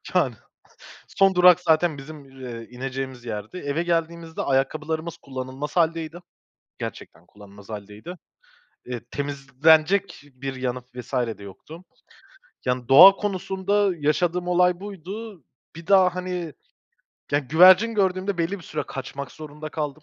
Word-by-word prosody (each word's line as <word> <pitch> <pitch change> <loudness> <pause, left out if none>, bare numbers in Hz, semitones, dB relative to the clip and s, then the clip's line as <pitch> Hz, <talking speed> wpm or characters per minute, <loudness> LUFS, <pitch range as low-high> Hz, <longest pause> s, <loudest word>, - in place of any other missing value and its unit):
yani, - - +2 0.7
son 195 -1 +3
durak 180 -1 +7
zaten 160 -2 +2
bizim, 150 +1 -10 0.2
eee, 115 -3 -8
ineceğimiz 130 0 -6
yerdi. 110 - -6
Eve 145 +1 -2
geldiğimizde 165 -1 -2
ayakkabılarımız 155 +4 -1
kullanılmaz 130 +3 -7
hâldeydi. 165 0 0 0.6
Gerçekten 85 - -8
kullanılmaz 100 0 -16
hâldeydi. 105 - -8 0.7
Eee, 125 -1 -5
temizlenecek 145 +7 +1
bir 135 +1 -5
yanı 125 -1 -3
vs. 125 +1 -9 0.3
de 100 - -13
yoktu. 155 - -12 0.8
Yani, 125 -1 -1
doğa 145 +9 +10
konusunda 200 0 0
yaşadığım 175 +4 0
olay 180 0 +3
buydu. 200 - -8 0.3
Bir 165 +1 -11
daha, 185 -2 +5
hani, 180 -3 -4 1.0
güvercin 185 +7 +7
gördüğümde 190 -1 0
belli 170 +4 -1
bir 170 - -14
süre 155 - -4
kaçmak 135 0 -7
zorunda 155 0 -9
kaldım. 150 -1 -4
160 Hz, 120 wpm, -24 LUFS, 135-180 Hz, 1.0 s, doğa